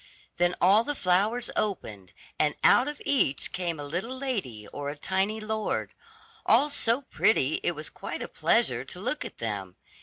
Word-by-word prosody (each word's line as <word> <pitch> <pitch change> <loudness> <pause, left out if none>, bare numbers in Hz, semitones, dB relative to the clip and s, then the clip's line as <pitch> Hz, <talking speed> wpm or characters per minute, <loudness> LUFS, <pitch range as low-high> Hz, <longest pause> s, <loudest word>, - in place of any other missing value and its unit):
Then 175 0 +2
all 200 +5 +5
the 290 +3 -3
flowers 210 +5 +1
opened, 105 - -3 0.3
and 150 -1 +2
out 250 - +6
of 295 0 -5
each 255 - +1
came 175 -4 -2
a - - -5
little 185 - -4
lady 195 - -4
or 145 0 -5
a 145 - -6
tiny 190 +7 0
lord, 215 0 -2 0.5
all 275 +6 +4
so 245 -1 +2
pretty 155 - +2
it 175 - 0
was 150 0 -7
quite - - -6
a - - -5
pleasure - - +2
to - - -8
look - - -2
at - - -8
them. 100 -5 -4
190 Hz, 175 wpm, -27 LUFS, 145-230 Hz, 0.5 s, out